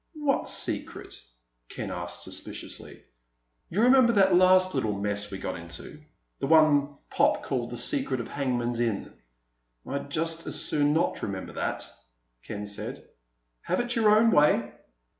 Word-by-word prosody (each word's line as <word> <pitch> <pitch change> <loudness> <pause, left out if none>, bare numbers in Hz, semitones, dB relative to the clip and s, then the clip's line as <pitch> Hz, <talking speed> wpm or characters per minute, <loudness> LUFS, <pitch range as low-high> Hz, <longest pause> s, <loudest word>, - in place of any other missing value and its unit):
"What 295 -3 0
secret?" - - -3 0.5
Ken - - -6
asked 85 0 -4
suspiciously. - - -6 0.7
"You 205 +6 +1
remember 250 -1 +6
that 195 -3 +4
last 185 +1 +5
little 110 -7 -1
mess 105 0 -2
we 95 - -6
got 95 - -4
into—the 115 - -9
one 145 -2 +4
Pop - - +2
called 120 -3 -2
The 120 - -6
Secret 130 - +1
of 120 - -5
Hangman's 120 -4 -2
Inn?" 115 -4 -2 0.7
"I'd 140 +1 -5
just 165 +2 -1
as - - -2
soon 145 -1 +1
not 160 - 0
remember 95 -2 -5
that," - - -3 0.5
Ken 105 +8 -6
said. 100 0 -6 0.5
"Have - - -1
it 245 +1 -1
your 225 -2 +4
own 220 +2 +5
way." 145 - +3
140 Hz, 140 wpm, -27 LUFS, 110-185 Hz, 0.7 s, remember